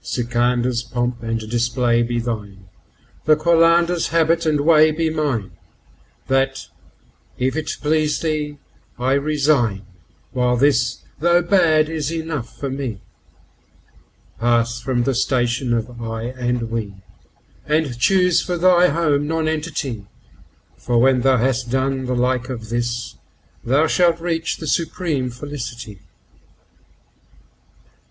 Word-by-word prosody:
Sikandar's3 120 0 -1
pomp 120 -1 -2
and 115 0 -2
display 120 +1 +1
be 120 0 -1
thine, 105 -5 -5 0.6
the 155 - +5
Qalandar's4 170 +2 +3
habit 165 0 +2
and 150 -2 +2
way 155 0 +5
be 160 +1 -1
mine; 140 -11 -2 0.7
That, 135 0 0 0.7
if 130 +2 -1
it 160 -1 -3
please 150 0 +1
thee, 150 -2 -2 0.4
I 130 +2 +1
resign, 140 -8 +1 0.5
while 125 -1 +1
this, 120 -3 +1 0.2
though 175 +2 +3
bad, 165 -4 +3
is 160 -1 -3
enough 160 -7 -5
for 140 - -4
me. 130 -6 -4 1.4
Pass 120 0 +1
from 125 -3 0
the 135 +2 0
station 120 0 0
of 120 +1 -2
"I" 115 -1 -4
and 125 -2 -3
"We," 110 -4 -4 0.7
and 150 -4 0
choose 180 +4 +3
for 180 -1 -3
thy 180 0 +5
home 145 -2 +1
Nonentity, 155 -8 -2 0.7
For 120 -1 -1
when 130 +1 +4
thou 130 0 +3
has 125 +1 +1
done 130 +2 -1
the 125 - -1
like 125 +1 0
of 115 -4 -6
this, 120 0 -3 0.5
thou 140 +6 +3
shalt 170 0 +2
reach 165 -1 -2
the 160 - -7
supreme 160 -5 -1
Felicity. 120 -5 -7
130 Hz, 120 wpm, -20 LUFS, 120-155 Hz, 1.4 s, the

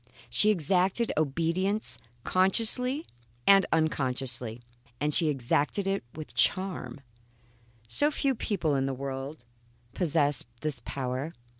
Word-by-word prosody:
She 130 - +5
exacted 190 +4 +1
obedience 170 +8 0 0.2
consciously 235 - +2 0.4
and 195 -1 +6
unconsciously, 125 -6 0 0.4
and 150 +1 0
she 165 - +3
exacted 145 - 0
it 195 -4 -1
with 150 -6 -8
charm. 185 +5 0 0.9
Some 290 - +4
few 280 -2 0
people 185 - -1
in 135 -1 +1
the 135 - -2
world 135 +1 -6 0.5
possess 150 -5 +1 0.2
this 145 -5 -3
power. 130 +4 -3
155 Hz, 110 wpm, -28 LUFS, 135-195 Hz, 0.9 s, and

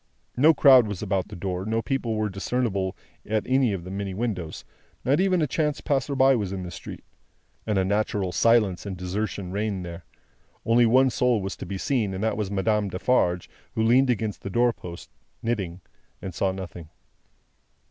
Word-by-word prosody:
No 150 +6 +6
crowd 130 -5 +7
was 105 -1 -5
about 95 -2 -1
the - - -9
door; 90 0 -3
no 110 +2 -1
people 130 -5 -1
were 110 0 0
discernible 100 -1 -2 0.3
at 110 0 -1
any 130 -3 +2
of 95 -4 -4
the 90 - -8
many 100 -1 -4
windows; 95 -8 -4 0.4
not 140 +5 +3
even 185 -3 +3
a - - +3
chance 150 +2 -1
passerby 135 -2 +2
was 100 -5 -2
in 95 -1 -4
the 90 - -6
street. - - -9 0.6
An 105 -2 +1
unnatural 100 0 0
silence 105 -4 +2
and 95 -2 -5
desertion 90 0 -3
reigned 100 -2 -2
there. 85 0 -8 0.6
Only 115 +1 +5
one 130 +3 +4
soul 125 -1 +2
was 95 -1 -4
to - - -7
be 100 - -4
seen, 105 -4 0
and 95 - -3
that 110 - +1
was 105 -2 -2
Madame 100 +1 0
Defarge 90 -2 +1 0.3
who 110 - +1
leaned 125 +4 +4
against 110 -3 -1
the 95 - -5
door 120 +4 +2
post, 85 -4 -10 0.3
knitting, 95 -7 -2 0.4
and 95 - -6
saw 95 +3 0
nothing. 90 -4 -8
105 Hz, 180 wpm, -25 LUFS, 95-120 Hz, 0.6 s, crowd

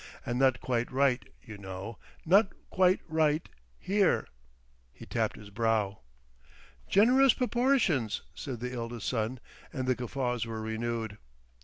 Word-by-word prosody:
And 120 +1 -1
not 130 -2 +4
quite 120 -2 -1
right, 130 -1 +2 0.2
you 110 -4 -10
know. 95 +3 -7 0.3
Not 195 +4 +5 0.2
quite 185 0 +3
right—here." 155 - 0 0.6
He - - -12
tapped - - -1
his 105 -1 -12
brow. 110 -2 0 0.9
"Generous 250 +6 +5
proportions!" 240 - +1
said 125 -5 -6
the 125 +1 -4
eldest 115 -2 -5
son, 120 +1 -1 0.3
and 130 - -3
the 130 - +4
guffaws 125 -1 -2
were 110 -1 -4
renewed. 110 -1 -3
125 Hz, 125 wpm, -30 LUFS, 110-160 Hz, 0.9 s, Not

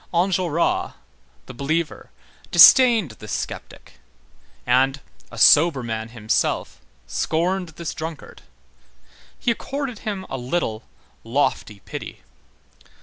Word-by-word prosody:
Enjolras, 175 -2 0 0.5
the - - -10
believer, 155 +6 -3 0.4
disdained 235 - +7
this 105 - -9
sceptic; - - -7 0.7
and, 130 +3 +2 0.3
a 120 - -12
sober 145 +3 +5
man 110 -1 -4
himself, 110 -2 -2 0.2
scorned 180 +2 -1
this 170 -2 -5
drunkard. 160 -1 -8 1.0
He 240 - 0
accorded 270 0 -5
him 200 -3 -5
a 135 - -5
little 125 -4 -2 0.4
lofty 115 -4 -1
pity. - - -9
160 Hz, 95 wpm, -22 LUFS, 120-185 Hz, 1.0 s, disdained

